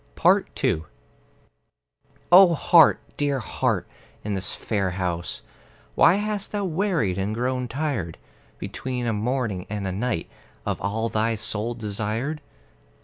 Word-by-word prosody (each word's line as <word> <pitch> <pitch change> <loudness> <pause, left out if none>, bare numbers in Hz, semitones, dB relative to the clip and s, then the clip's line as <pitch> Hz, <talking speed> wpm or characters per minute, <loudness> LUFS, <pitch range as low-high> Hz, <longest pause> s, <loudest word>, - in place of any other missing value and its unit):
II 80 - +1 1.5
O 180 -1 +8
Heart, 165 0 +6 0.2
dear 145 -1 +1
Heart, 120 - -1 0.4
in 105 - -2
this 95 -1 -2
fair 100 -4 -1
house 85 -2 -3 0.5
Why 175 - +6
hast 210 0 -2
thou 205 -1 -1
wearied 165 - 0
and 100 +3 -1
grown 125 +1 -1
tired, 130 - -3 0.4
Between 125 -2 -4
a 115 - 0
morning 110 -4 -2
and 105 -1 -3
a 95 - -1
night, 110 0 -2 0.4
Of - - -2
all 110 +4 -1
thy 115 +1 +1
soul 110 +2 -2
desired? 110 +7 -3
115 Hz, 125 wpm, -24 LUFS, 100-145 Hz, 1.5 s, O